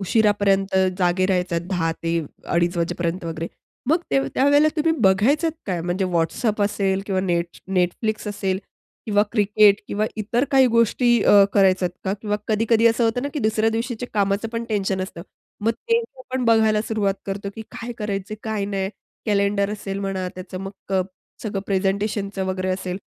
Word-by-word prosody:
उशिरापर्यंत 200 -2 +2 0.2
जागे 180 0 +2
राहायचात 180 -3 0
10:00 175 -4 0
ते 165 0 0 0.4
अडीच 175 +1 +2
वाजेपर्यंत 170 +1 -2
वगैरे, 165 0 -4 0.4
मग 325 +4 +3
ते 135 - +3
त्यावेळेला 285 +3 +5
तुम्ही 320 +1 +2
बघायचात 245 - +3 0.2
काय? 180 -4 -1
म्हणजे 175 +3 -1
WhatsApp 205 +6 0
असेल 195 -1 0
किंवा 190 -2 0
नेट 170 -2 -1 0.2
Netflix 210 +5 -1
असेल 195 -2 -1 0.5
किंवा 205 -1 +3
क्रिकेट 210 -1 +4
किंवा 210 +1 0
इतर 230 +4 0
काही 265 -2 +6
गोष्टी 235 0 +3
अ, 200 -1 +7
करायचात 190 -2 +3
का? 190 - 0
किंवा 210 -1 -1
कधी-कधी 225 +1 +3
असं 230 +1 +3
होतं 230 +2 +1
ना, 285 - -1
की - - -1
दुसऱ्या 220 -2 +2
दिवशीच्या 235 +1 -3
कामाचं 200 +1 +1
पण 230 0 -2
टेन्शन 195 -3 0
असतं. 170 -3 -7 0.4
मग 225 +2 +2
ते 460 - 0 0.3
पण 260 -1 0
बघायला 220 -2 +4
सुरुवात 205 -3 +1
करतो, 200 0 -4
की 220 - -6
काय 240 +1 -6
करायचं 205 0 -3
काय 215 -2 -2
नाही. 195 -1 -2 0.4
कॅलेंडर 200 -1 +1
असेल 200 -2 -4
म्हणा 190 -2 -2
त्याचं 185 0 -7
मग 195 0 -9
अ, 185 - +3 0.4
सगळं 205 -3 -3
प्रेझेंटेशनचं 195 0 -1
वगैरे 185 0 -2
असेल. 185 -1 -3
200 Hz, 165 wpm, -22 LUFS, 190-220 Hz, 0.5 s, अ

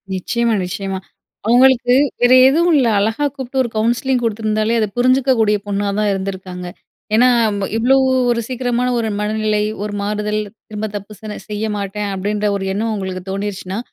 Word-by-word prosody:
நிச்சயமா, 235 +5 0
நிச்சயமா. 190 +1 -4 0.5
அவங்களுக்கு, 245 +1 +5 0.3
வேறு 245 +1 +6
எதுவு 335 +5 +2
இல்ல. 260 -4 +3
அழகா 220 +8 0
கூப்புட்டு 265 -1 -4
ஒரு 235 - -4
கவுன்சிலிங் 240 +3 +1
குடுத்துருந்தாலே 215 0 0
அத 215 - +1
புரிஞ்சுக்க 255 +2 +3
கூடிய 210 -1 +3
பொண்ணா 205 0 -1
தான் 210 -1 +1
இருந்துருக்காங்க. 190 -2 -5 0.5
ஏன்னா, 250 +3 +5 0.3
ம் 200 - -3
இவ்வளோ 245 +4 +3 0.4
ஒரு 235 -1 0
சீக்கிரமான 250 -1 -1
ஒரு 225 -1 -1
மனநிலை, 215 0 0 0.2
ஒரு 210 0 -4
மாறுதல், 210 +1 -1 0.3
திரும்ப 215 0 -4
தப்பு 205 +1 -7
சென 215 -1 -6
செய்ய 210 +1 -2
மாட்டேன் 200 +1 -3
அப்டீன்ற 205 +2 -1
ஒரு 195 -1 -3
எண்ணம் 220 +3 -1
உங்களுக்கு 190 -2 -4
தோணிருச்சினா, 195 -1 -4
215 Hz, 155 wpm, -18 LUFS, 200-240 Hz, 0.5 s, வேறு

